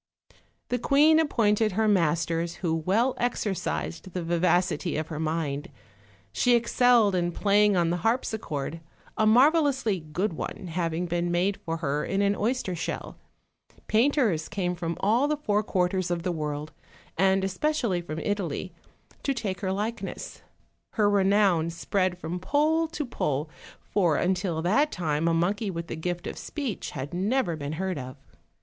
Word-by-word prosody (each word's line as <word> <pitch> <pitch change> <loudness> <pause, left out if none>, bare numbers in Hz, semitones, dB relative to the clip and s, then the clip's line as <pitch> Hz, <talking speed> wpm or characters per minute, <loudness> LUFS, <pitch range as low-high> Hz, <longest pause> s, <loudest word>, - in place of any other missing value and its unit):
The 245 - 0
queen 300 +5 +5
appointed 220 -8 +2
her 220 +3 +1
masters, 170 -3 +1
who 160 - +1
well 200 +11 +1
exercised 175 - -2
the 180 - -3
vivacity 175 0 +1
of 155 0 -3
her 155 -2 -5
mind; 155 -1 -2 0.6
she 245 -1 +3
excelled 235 -2 +4
in 175 -1 0
playing 205 +1 +3
on 170 -1 +2
the 175 - 0
harpsichord, 170 - -2 0.3
a 215 - +2
marvelously 265 - +4
good 165 +5 -2
one 180 +3 -6
having 170 0 -1
been 175 0 -1
made 180 +3 +1
for 165 0 -4
her 145 -2 -1
in 195 +1 0
an 200 0 +2
oyster 220 -4 -1
shell: 165 - -5 0.7
painters 225 - +2
came 185 -4 -1
from 170 -1 -4
all 230 +8 +3
the 300 0 0
four 210 -8 +1
quarters 185 -2 0
of 175 -1 -2
the 180 - 0
world, 150 -1 -4 0.4
and 190 +1 +3
especially 195 - 0
from 160 -2 -6
Italy, 185 -2 -3 0.5
to 275 - -1
take 205 -6 -3
her 190 -2 -1
likeness; 215 +4 -4 0.5
her 210 -2 +3
renown 195 -4 +3
spread 185 +2 -1
from 175 +1 -4
pole 310 - +2
to 315 -2 -4
pole, 150 - -2 0.3
for 175 -6 +1
until 180 -2 0
that 280 - +2
time 160 -2 -1
a 165 - +3
monkey 200 +5 0
with 170 -2 -4
the - - -5
gift 175 +1 -3
of - - -5
speech 275 -9 -4
had 135 +5 -5
never 195 0 0
been 145 -1 -5
heard 185 -1 -2
of. 130 +2 -8
185 Hz, 155 wpm, -27 LUFS, 165-215 Hz, 0.7 s, queen